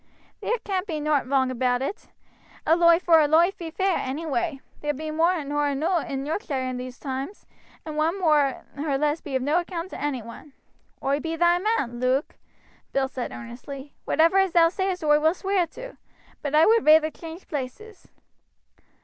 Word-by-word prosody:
"There 475 - 0
can't 385 -1 -2
be 315 -4 -3
nowt 295 -3 +1
wrong 265 -2 +2
about 250 0 0
it 395 +10 -5 0.6
a 325 - +5
loife 340 0 +5
vor 330 -2 +6
a 300 - +3
loife 335 +5 +4
be 335 -3 -7
fair, 380 +2 0
any 280 +6 -4
way. 320 -1 -1 0.2
There 295 0 -1
be 310 +2 -5
more 330 +1 +2
nor 290 +1 0
eno' 315 +6 +1
in 275 -3 -4
Yorkshire 300 -3 -2
in 255 -1 -3
these 250 0 -7
toimes, 275 +7 -5 0.4
and 310 -1 -6
one 325 +5 +1
more 300 -6 +2
or 285 -1 -1
less 300 +2 0
be 280 -3 -5
of 260 - 0
no 300 +5 +2
account 350 0 -5
to - - -7
any 275 -5 -2
one." 235 +5 -12 0.5
"Oi 275 +2 +1
be 325 +1 -3
thy 345 +1 +3
man, 355 - -1
Luke," 255 +4 0 0.6
Bill 270 -1 +1
said 255 -2 -5
earnestly. 265 +4 -9
"Whatever 330 +5 +4
as 385 -3 +2
thou 330 -1 +6
sayest 375 -1 -2
oi 295 -1 +4
will 315 +3 +2
sweer 385 -3 0
to; - - -10 0.4
but 290 0 -2
I 315 +2 +7
would 455 0 +4
reyther 310 0 +6
change 330 +3 -10
places." 320 - -7
310 Hz, 190 wpm, -25 LUFS, 275-345 Hz, 0.6 s, I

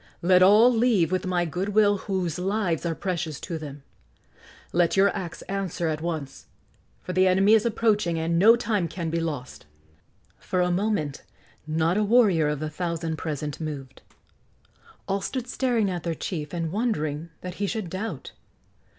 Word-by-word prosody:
Let 180 +1 +5
all 215 +6 +7
leave 225 -8 +2
with 185 0 -1
my 175 -1 +1
good 185 +5 -3
will 205 -1 +5
whose 185 -5 -2
lives 185 -4 -1
are 165 - -2
precious 170 -6 -3
to 165 -3 -5
them. 145 -2 -9 0.9
Let 175 +2 +2
your 200 +1 +4
acts 175 -3 -6
answer 190 -4 -3
at 155 0 -3
once, 160 -5 -5 0.6
for 185 - -5
the 185 +1 +4
enemy 195 +3 +4
is 225 +1 +4
approaching 210 -6 +1
and 165 +1 0
no 225 +5 +7
time 210 -6 -1
can 165 -1 -4
be 165 - 0
lost!" 145 - -5 0.7
For 185 - -2
a 180 0 +2
moment 175 -7 -1 0.5
not 160 +4 +1
a 210 - +2
warrior 205 -8 +4
of 150 -1 -1
the 155 0 -3
thousand 165 -1 -3
present 150 -1 -4
moved. 140 -4 -6 1.1
All 195 0 -1
stood 255 +4 -3
staring 245 -4 0
at 180 -2 -3
their 165 -1 -3
chief 150 -3 -5
and 165 -2 -3
wondering 165 -8 -2
that 180 0 -6
he 200 - +1
should 215 -2 -3
doubt. 185 - -5
180 Hz, 165 wpm, -25 LUFS, 160-205 Hz, 1.1 s, all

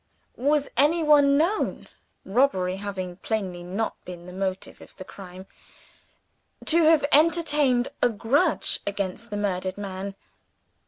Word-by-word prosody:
Was 285 +3 +1
anyone 295 -2 +4
known 350 +8 -1 0.4
(robbery 190 -5 +1
having 190 -3 -5
plainly 190 -5 -3
not 190 +6 -4
been 175 -1 -10
the 180 - -10
motive 190 0 -4
of - - -15
the 185 - -9
crime) 185 -1 -11 1.2
to 335 +1 +4
have 315 -2 +5
entertained 295 -5 +3
a - - +4
grudge 245 - +1
against 200 +2 -4
the 205 - -4
murdered 190 -2 -2
man? 195 -1 -6
205 Hz, 120 wpm, -25 LUFS, 185-285 Hz, 1.2 s, have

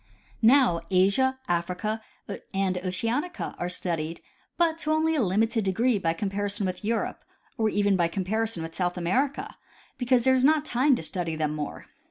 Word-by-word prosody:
Now 235 -7 +5
Asia, 200 +8 +3
Africa 180 +5 -1 0.5
and 190 -1 +1
Oceanica 230 - -2
are 175 - -2
studied, 165 -2 -2 0.4
but 330 -2 +2
to 310 - -1
only 315 +1 +2
a 305 - +1
limited 220 +3 +1
degree 215 +4 +1
by 165 -3 0
comparison 200 +2 -2
with 185 +1 -4
Europe 225 +2 -2 0.3
or 220 -4 +1
even 205 -1 +2
by 175 -2 +2
compari 205 +5 -1
son 170 -7 -3
with 165 0 -7
South 180 0 -1
America, 255 - -1 0.4
because 245 -1 +3
there 260 - +5
is 255 - +1
not 305 +1 +4
time 265 +1 +3
to 165 - -5
study 165 0 -3
them 155 -1 -1
more. 150 -1 -5
205 Hz, 170 wpm, -26 LUFS, 180-255 Hz, 0.5 s, Now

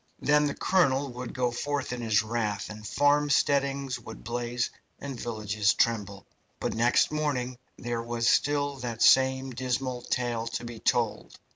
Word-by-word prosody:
Then 150 0 +3
the 140 - -3
colonel 140 -7 +2
would 125 0 -6
go 125 -1 0
forth 140 +1 -2
in 125 - -5
his 110 -2 +2
wrath, 110 -2 -2
and 105 0 -9
farmsteadings 140 -2 +2
would 110 -1 -11
blaze 120 0 -2 0.3
and 135 -4 -6
villages 105 -3 0
tremble; 100 -4 0 0.3
but - - -2
next 120 +2 +3
morning 130 -5 -2 0.2
there 120 -1 -3
was 115 0 -2
still 145 0 +2
that 120 -3 -2
same 130 0 +4
dismal 125 0 -2
tale 120 -2 -2
to 115 - -4
be 115 -1 -8
told. 110 -3 0
125 Hz, 150 wpm, -28 LUFS, 115-135 Hz, 0.3 s, same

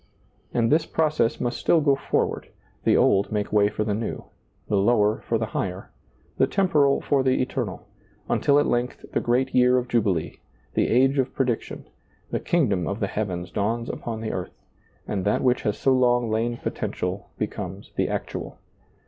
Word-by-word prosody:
And 115 0 +1
this 155 +1 +3
pro 160 -1 +1
cess 120 -6 0
must 120 - -2
still 170 - +3
go 145 -2 +3
forward, - - -1 0.4
the - - +4
old 100 0 +3
make 105 -1 -2
way 105 -1 +4
for 105 - -2
the 105 -1 -1
new, 110 +2 -3 0.4
the 105 - 0
lower 105 +1 +3
for 115 - +2
the 110 - -1
higher, 95 0 -3 0.5
the - - +5
temporal 150 -8 +2
for 140 -2 +2
the 130 0 +2
eternal, 125 -6 -3 0.4
until 140 - +3
at 145 - +4
length 120 +1 -1
the - - +1
great 125 +2 0
year 125 0 +5
of 125 0 -1
Jubilee, 95 -9 0 0.3
the - - +2
age 135 +3 +3
of 130 - -1
prediction, 125 -4 -2 0.5
the - - 0
kingdom 105 - +1
of 100 +2 -3
the 105 - +1
heavens 90 -4 -3
dawns 115 +4 -1
upon 115 -2 -5
the 110 - -3
earth, 90 - -5 0.5
and 100 -3 -2
that 105 - +1
which 125 -1 +2
has 105 -2 -1
so 135 - +3
long 120 -2 +2
lain 115 +2 0
potential 90 -3 -4
becomes - - -5
the - - 0
actual. - - -4
120 Hz, 180 wpm, -24 LUFS, 105-130 Hz, 0.5 s, the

